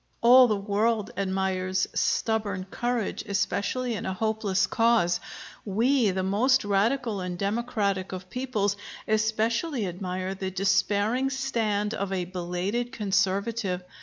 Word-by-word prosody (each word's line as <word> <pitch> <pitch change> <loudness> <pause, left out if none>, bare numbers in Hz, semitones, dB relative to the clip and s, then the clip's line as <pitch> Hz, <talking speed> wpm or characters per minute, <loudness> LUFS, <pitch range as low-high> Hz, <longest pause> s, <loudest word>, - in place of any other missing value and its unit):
All 250 +2 +8
the 215 - +1
world 210 +2 0
admires 190 -1 0
stubborn 210 -4 0
courage, 240 -3 -2
especially 210 +5 -1
in 210 - -4
a 190 - -2
hopeless 210 -2 +1
cause. 225 -7 +2 0.4
We, 230 +3 +2
the 190 0 -1
most 225 +7 +2
radical 215 +2 +1
and 180 -1 -4
democratic 200 -2 -1
of 185 0 -6
peoples, 220 -6 -1 0.3
especially 220 +5 0
admire 185 +1 -4
the 190 0 -4
despairing 205 +6 +1
stand 225 -6 -1
of 200 0 -3
a 185 -2 -1
belated 185 +7 -3
conservative. 200 -3 0
205 Hz, 120 wpm, -27 LUFS, 190-235 Hz, 0.4 s, All